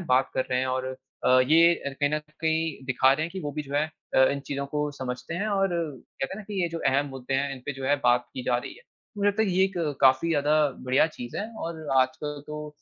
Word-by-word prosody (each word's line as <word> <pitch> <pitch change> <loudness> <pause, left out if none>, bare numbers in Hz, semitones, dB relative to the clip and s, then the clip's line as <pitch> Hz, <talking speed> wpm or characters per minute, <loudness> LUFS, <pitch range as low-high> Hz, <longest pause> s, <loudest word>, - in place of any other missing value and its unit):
बात 130 +1 +2
कर 130 - 0
रहे 125 0 +1
हैं 130 - 0
और 130 0 -1 0.4
अ, 130 0 +6
ये 165 +6 +6 0.3
कहीं 145 -1 +2
न 155 - +1
कहीं 160 -2 -2
दिखा 130 0 +4
रहे 155 +3 -1
हैं 170 - -8
कि 190 - -5
वो - - -2
भी 150 +1 -3
जो 140 0 -5
है 150 +1 +3 0.3
अ, 130 - +7
इन 140 - -2
चीज़ों 140 0 -3
को 150 0 0
समझते 125 +5 -4
हैं 215 - 0
और 195 -2 +2
कहते 155 -2 -4
है - - -7
ना - - -8
कि 200 -2 -3
ये 170 - 0
जो 165 0 -5
अहम 135 +2 +2
मुद्दे 135 0 -5
हैं, 140 +1 0
इन - - -11
पे 140 - -3
जो 135 0 -6
है 145 +2 +4
बात 125 0 +3
की 130 - -5
जा 125 -1 +2
रही 125 - -6
है, 470 - -17 0.4
मुझे 205 0 +2
लगता 205 +2 0
है 220 - +2
कि - - -1
ये 190 - +5
एक 195 - -5 0.3
काफ़ी 130 +4 +5
ज़्यादा 150 -2 +2 0.3
बढ़िया 130 +3 +4
चीज़ 120 -6 -8
है 215 +3 -4
और 160 -2 -5
आजकल 145 +3 -3
तो 150 0 -5
145 Hz, 265 wpm, -26 LUFS, 130-165 Hz, 0.4 s, अ